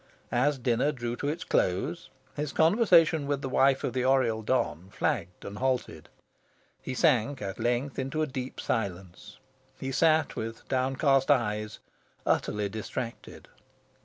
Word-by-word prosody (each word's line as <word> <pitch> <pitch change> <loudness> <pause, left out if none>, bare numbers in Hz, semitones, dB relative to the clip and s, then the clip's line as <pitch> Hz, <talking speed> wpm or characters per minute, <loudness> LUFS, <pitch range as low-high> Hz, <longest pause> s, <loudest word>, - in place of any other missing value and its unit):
As 140 +4 +2
dinner 125 +3 +1
drew 120 -4 -4
to 145 - -3
its 155 +4 -2
close, 90 +1 0 0.3
his 150 -1 -3
conversation 165 -4 +4
with 140 -1 -1
the - - -1
wife 135 +1 +3
of - - -2
the 130 -1 0
Oriel 125 -4 +2
don 95 -7 -1
flagged 90 -2 -2
and 100 +1 -7
halted. 130 -1 -2 0.7
He 130 - -5
sank, 130 -2 +2
at 95 -2 -5
length, 125 +4 -1
into 135 +4 -1
a - - +2
deep 130 -2 -6
silence. 95 -5 -4 0.4
He 135 - -4
sat 160 +1 +3
with 115 +1 -6
downcast 135 +1 +2
eyes, 105 -6 +1 0.5
utterly 105 -1 0
distracted. 110 +3 -6
130 Hz, 140 wpm, -28 LUFS, 110-145 Hz, 0.7 s, conversation